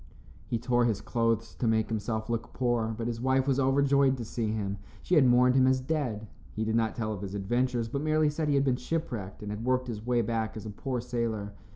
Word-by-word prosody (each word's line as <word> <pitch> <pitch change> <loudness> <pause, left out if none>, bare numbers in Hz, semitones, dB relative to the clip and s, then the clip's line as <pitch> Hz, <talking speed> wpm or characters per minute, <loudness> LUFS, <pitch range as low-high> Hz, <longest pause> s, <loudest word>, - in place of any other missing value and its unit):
He 115 - 0
tore 120 +1 +2
his 110 -4 +1
clothes 115 0 0
to 120 - -2
make 110 -1 +2
himself 110 0 -2
look 115 -1 -3
poor, 120 -3 0
but 115 - -3
his 115 -1 -3
wife 130 +1 +2
was 135 -1 +2
overjoyed 140 0 +3
to 120 - -5
see 115 0 -2
him. 100 -2 -3 0.2
She - - -2
had 150 -6 +6
mourned 125 +1 +5
him 130 0 +4
as 130 0 +3
dead. 130 -6 -2 0.3
He 110 - -2
did 110 0 0
not 115 -1 +1
tell 110 -2 -2
of 100 - -6
his 100 0 -5
adventures, 120 +4 0
but 140 +5 -3
merely 155 0 +2
said 150 0 -2
he 145 - +3
had 140 - +3
been 130 -2 +2
ship 165 +3 -3
wrecked 100 -4 -6
and 105 - -4
had 105 +2 -5
worked 130 +1 +1
his 110 -3 -5
way 120 0 +1
back 110 0 -2
as 110 - -7
a 110 - -5
poor 125 +3 -3
sailor. 115 -4 -3
120 Hz, 245 wpm, -29 LUFS, 110-130 Hz, 0.3 s, had